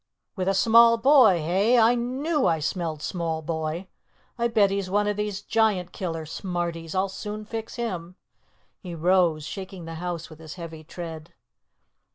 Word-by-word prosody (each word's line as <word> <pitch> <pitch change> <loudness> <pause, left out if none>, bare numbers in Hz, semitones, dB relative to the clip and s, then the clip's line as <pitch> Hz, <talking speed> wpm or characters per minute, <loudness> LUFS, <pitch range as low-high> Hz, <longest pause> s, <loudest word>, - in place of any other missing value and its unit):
"With 185 -2 -2
a 195 - +2
small 230 +3 +6
boy, 240 - +6
eh? 200 +9 +3
I 230 +1 +5
knew 260 +5 0
I 165 - +2
smelled 155 -1 -3
small 165 -3 -2
boy. 160 +2 -3 0.5
I'll 235 -1 0
bet 210 -4 +3
he's 195 -1 -2
one 205 +2 +2
of 210 0 0
these 210 -1 -3
Giant 210 -6 +1
killer 165 -4 -4
smarties. 170 -1 -4
I'll 190 +1 +2
soon 210 +2 -6
fix 225 +1 -6
him." 185 -8 -4 0.6
He 180 -4 -7
rose, 170 -2 +2
shaking 190 -1 -7
the 165 - -7
house 175 -2 -4
with 155 -1 -14
his 160 -1 -9
heavy 165 -3 -8
tread. 165 -1 -8
185 Hz, 165 wpm, -25 LUFS, 165-215 Hz, 0.6 s, small